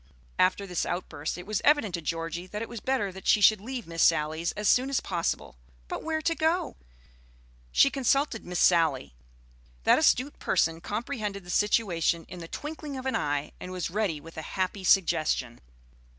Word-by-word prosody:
After 185 Hz, +2 st, +3 dB
this 180 Hz, -2 st, -2 dB
outburst 175 Hz, -4 st, -4 dB
it 180 Hz, -, -8 dB
was 215 Hz, -1 st, -2 dB
evident 290 Hz, -10 st, +3 dB
to 170 Hz, -, -2 dB
Georgie 165 Hz, +2 st, -4 dB
that 210 Hz, +3 st, -5 dB
it -, -, -6 dB
was 235 Hz, -1 st, -7 dB
better 250 Hz, -5 st, -1 dB
that 190 Hz, 0 st, -10 dB
she -, -, +5 dB
should 210 Hz, 0 st, +5 dB
leave 245 Hz, +1 st, -5 dB
Miss 165 Hz, -1 st, -3 dB
Sally's 155 Hz, +2 st, +2 dB
as 210 Hz, 0 st, -2 dB
soon 255 Hz, +6 st, +4 dB
as 275 Hz, -, +1 dB
possible. 170 Hz, -, -3 dB, 0.3 s
But -, -, -4 dB
where 315 Hz, -1 st, -2 dB
to 330 Hz, -, +2 dB
go? 325 Hz, +2 st, 0 dB, 1.0 s
She 275 Hz, -, +5 dB
consulted 275 Hz, -2 st, +1 dB
Miss 180 Hz, 0 st, -4 dB
Sally. 165 Hz, -, +3 dB, 0.7 s
That -, -, +5 dB
astute 290 Hz, -2 st, +2 dB
person 165 Hz, -2 st, +1 dB
comprehended 210 Hz, -2 st, -4 dB
the 175 Hz, -, -7 dB
situation 175 Hz, -6 st, +1 dB
in 180 Hz, -, -8 dB
the 165 Hz, -, -8 dB
twinkling 295 Hz, -, -6 dB
of 260 Hz, -, -7 dB
an 265 Hz, -, 0 dB
eye, 145 Hz, 0 st, -1 dB
and 180 Hz, -, -7 dB
was 180 Hz, -2 st, -3 dB
ready 195 Hz, -6 st, -1 dB
with 165 Hz, +2 st, -13 dB
a 160 Hz, -, -8 dB
happy 190 Hz, +1 st, -1 dB
suggestion. 155 Hz, -10 st, +2 dB
190 Hz, 180 wpm, -28 LUFS, 165-250 Hz, 1.0 s, she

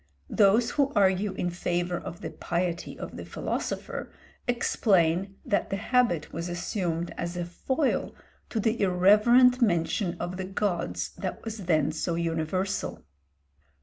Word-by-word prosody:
Those 220 Hz, +3 st, +4 dB
who 280 Hz, -1 st, +2 dB
argue 195 Hz, 0 st, +3 dB
in 175 Hz, -, -2 dB
favour 175 Hz, 0 st, -1 dB
of 170 Hz, -, -8 dB
the -, -, -5 dB
piety 175 Hz, 0 st, -2 dB
of -, -, -7 dB
the -, -, -6 dB
philosopher, -, -, -4 dB, 0.4 s
explain 195 Hz, -6 st, +2 dB
that 200 Hz, -, 0 dB
the -, -, -1 dB
habit 220 Hz, -6 st, +1 dB
was 170 Hz, +2 st, -4 dB
assumed 175 Hz, -1 st, -2 dB
as 170 Hz, +1 st, -3 dB
a 175 Hz, -, -2 dB
foil 265 Hz, -, -1 dB, 0.3 s
to 225 Hz, -, -2 dB
the 220 Hz, +2 st, 0 dB
irreverent 210 Hz, +7 st, +5 dB
mention 175 Hz, -2 st, +1 dB
of 175 Hz, +1 st, -4 dB
the 190 Hz, -, -3 dB
gods 190 Hz, -2 st, -2 dB
that -, -, -4 dB
was 220 Hz, -4 st, -5 dB
then 155 Hz, -3 st, +2 dB
so 165 Hz, +2 st, -2 dB
universal. 170 Hz, +3 st, -2 dB
185 Hz, 140 wpm, -27 LUFS, 170-210 Hz, 0.4 s, irreverent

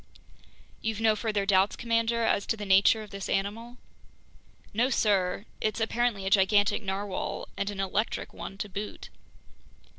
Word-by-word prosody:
"You've 220 Hz, -1 st, -2 dB
no 220 Hz, -1 st, +4 dB
further 210 Hz, -2 st, -1 dB
doubts, 195 Hz, 0 st, +3 dB
commander, 230 Hz, 0 st, 0 dB
as 205 Hz, -2 st, +1 dB
to 225 Hz, -, 0 dB
the 210 Hz, -, -5 dB
nature 195 Hz, +3 st, +5 dB
of 210 Hz, -, -13 dB
this 200 Hz, -1 st, -6 dB
animal?" 225 Hz, +5 st, -2 dB, 1.0 s
"No, 240 Hz, +5 st, +2 dB
sir, 200 Hz, -5 st, +1 dB, 0.2 s
it's 215 Hz, 0 st, -1 dB
apparently 225 Hz, -3 st, 0 dB
a -, -, 0 dB
gigantic 205 Hz, +2 st, +4 dB
narwhale, 195 Hz, -1 st, -3 dB
and 200 Hz, -, -2 dB
an 200 Hz, -1 st, -6 dB
electric 195 Hz, +3 st, -2 dB
one 195 Hz, -, -8 dB
to 210 Hz, -, -4 dB
boot." 205 Hz, +2 st, -6 dB
205 Hz, 150 wpm, -28 LUFS, 195-225 Hz, 1.0 s, nature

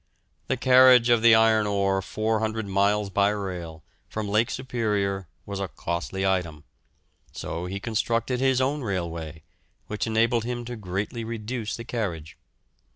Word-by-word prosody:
The 130 Hz, -, 0 dB
carriage 125 Hz, -1 st, +6 dB
of 120 Hz, -2 st, +4 dB
the 115 Hz, -1 st, +7 dB
iron 110 Hz, -1 st, +4 dB
ore 100 Hz, -1 st, +1 dB
400 110 Hz, +2 st, -1 dB
miles 100 Hz, +1 st, +1 dB
by 100 Hz, +1 st, +3 dB
rail, 90 Hz, -6 st, -5 dB, 0.3 s
from 110 Hz, -1 st, -4 dB
Lake 110 Hz, +4 st, +2 dB
Superior, 105 Hz, -7 st, -2 dB, 0.2 s
was 100 Hz, -1 st, -5 dB
a 100 Hz, -, -2 dB
costly 90 Hz, +2 st, -3 dB
item, 85 Hz, -6 st, -1 dB, 0.7 s
so 85 Hz, +2 st, -5 dB
he 95 Hz, +2 st, -4 dB
constructed 115 Hz, +3 st, -1 dB
his 130 Hz, -1 st, +2 dB
own 140 Hz, +3 st, 0 dB
railway, 85 Hz, -, -4 dB, 0.4 s
which 105 Hz, +2 st, -3 dB
enabled 115 Hz, +1 st, +2 dB
him 120 Hz, 0 st, -4 dB
to 120 Hz, +1 st, -5 dB
greatly 105 Hz, +3 st, -4 dB
reduce 115 Hz, 0 st, -4 dB
the 115 Hz, -, -7 dB
carriage. 85 Hz, -10 st, -4 dB
105 Hz, 145 wpm, -25 LUFS, 95-115 Hz, 0.7 s, the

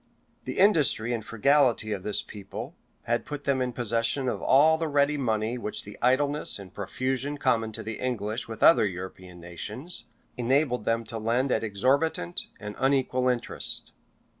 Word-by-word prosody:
The -, -, -5 dB
industry 150 Hz, -, +3 dB
and 115 Hz, -2 st, -3 dB
frugality 120 Hz, -1 st, +2 dB
of 100 Hz, -3 st, -2 dB
this 105 Hz, +2 st, -1 dB
people 100 Hz, -2 st, -8 dB, 0.3 s
had 120 Hz, +1 st, 0 dB
put 145 Hz, -1 st, -6 dB
them 135 Hz, -2 st, +1 dB
in 125 Hz, -1 st, -1 dB
possession 120 Hz, +3 st, -1 dB
of 125 Hz, -, -2 dB
all 155 Hz, +4 st, +5 dB
the 165 Hz, -, -1 dB
ready 145 Hz, 0 st, +2 dB
money 115 Hz, -3 st, -1 dB
which 105 Hz, -, -2 dB
the 105 Hz, -, -10 dB
idleness 140 Hz, +4 st, +2 dB
and 95 Hz, -3 st, -11 dB
profusion 130 Hz, +7 st, -2 dB
common 115 Hz, -5 st, +1 dB
to 110 Hz, -, -5 dB
the 110 Hz, 0 st, -6 dB
English 115 Hz, -3 st, -2 dB
with 115 Hz, -1 st, -5 dB
other 135 Hz, -10 st, +7 dB
European 90 Hz, -1 st, -8 dB
nations, 105 Hz, -, -4 dB, 0.3 s
enabled 125 Hz, -1 st, +1 dB
them 115 Hz, 0 st, +1 dB
to 115 Hz, 0 st, -5 dB
lend 120 Hz, +5 st, 0 dB
at -, -, +1 dB
exorbitant 115 Hz, -, 0 dB
and 105 Hz, 0 st, -7 dB
unequal 130 Hz, -1 st, +2 dB
interest. 120 Hz, -1 st, 0 dB
120 Hz, 165 wpm, -27 LUFS, 110-135 Hz, 0.3 s, other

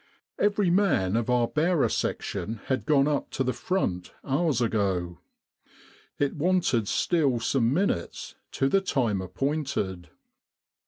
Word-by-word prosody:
Every 205 Hz, -3 st, +2 dB
man 160 Hz, -, +2 dB
of 115 Hz, +1 st, 0 dB
our 120 Hz, -1 st, +3 dB
bearer 160 Hz, +2 st, +2 dB
section 110 Hz, +1 st, -3 dB
had 130 Hz, -1 st, -2 dB
gone 145 Hz, -2 st, +4 dB
up 145 Hz, -2 st, -1 dB
to 135 Hz, -, 0 dB
the 130 Hz, 0 st, -1 dB
front 105 Hz, -, -2 dB
hours 145 Hz, -1 st, +1 dB
ago. 95 Hz, -7 st, -1 dB, 1.0 s
It 145 Hz, -1 st, 0 dB
wanted 155 Hz, -, +1 dB
still 145 Hz, -, +1 dB
some 115 Hz, +1 st, +1 dB
minutes 150 Hz, -, -1 dB, 0.2 s
to 135 Hz, -, +1 dB
the 195 Hz, +7 st, +3 dB
time 120 Hz, -, 0 dB
appointed. 95 Hz, -, -3 dB
135 Hz, 125 wpm, -27 LUFS, 105-160 Hz, 1.0 s, gone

